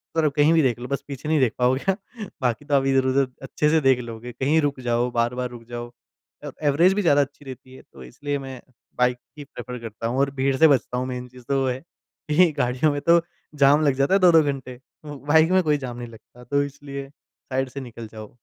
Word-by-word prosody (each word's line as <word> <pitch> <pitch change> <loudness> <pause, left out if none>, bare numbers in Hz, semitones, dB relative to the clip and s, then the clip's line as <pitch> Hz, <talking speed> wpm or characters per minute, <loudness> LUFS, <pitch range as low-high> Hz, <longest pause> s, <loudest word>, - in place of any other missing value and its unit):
तरफ 155 -3 +2
कहीं 150 +2 +4
भी 165 - +4
देख 125 -5 +1
लो 125 - -6
बस 140 - -2
पीछे 140 +1 -6
नहीं 155 -1 +3
देख 125 -4 +2
पाओगे 130 +10 +2 0.5
बाकी 125 +3 -1
तो 145 - -3
आप 135 -1 +3
इधर-उधर 135 0 +2 0.2
अच्छे 150 +2 0
से 160 0 +3
देख 135 -2 +4
लोगे। 120 0 -7
कहीं 140 +6 +1
रुक 145 -2 -1
जाओ 120 +1 +1
बार-बार 120 +1 -1
रुक 120 -1 -11
जाओ 120 0 -6 0.5
अ 145 - -5 0.2
एवरेज 170 +7 +4
भी 205 - 0
ज़्यादा 145 -6 +4
अच्छी 140 +1 -6
रहती 130 -1 -10
है। - - -13
तो 65 -2 -12
इसलिए 145 - -4
मैं 135 -2 -8 0.4
बाइक 125 0 +2 0.2
ही 145 - -7
प्रेफ़र 125 -2 -8
करता 115 -1 -6
हूँ, 125 +3 -1
और 140 0 +2
भीड़ 135 0 +1
से 160 - +7
बचता 130 -3 +1
हूँ। 130 +1 -2
मेन 125 -1 -5
चीज़ 125 0 -15
तो 135 -1 +1
वो 135 - 0
है, 125 0 -3 0.5
कि 165 +3 +5
गाड़ियों 125 +5 +1
में 145 0 -3
तो 170 +3 +5 0.3
जाम 145 +2 +5
लग 140 - +3
जाता 140 +6 +1
है 195 - +5
2-2 170 -4 +6
घंटे। 130 -3 -4 0.3
ब 145 -2 -8
बाइक 160 +3 +5
में 185 0 +5
कोई 150 -2 +2
जाम 125 -3 -6
नहीं 120 0 -6
लगता। 115 +2 -16
तो 140 +3 0
इसलिए 140 -1 -7
साइड 135 -2 -6
से 135 +2 -7
निकल 115 -2 -9
जाओ, 110 -1 -9
135 Hz, 235 wpm, -23 LUFS, 125-145 Hz, 0.5 s, से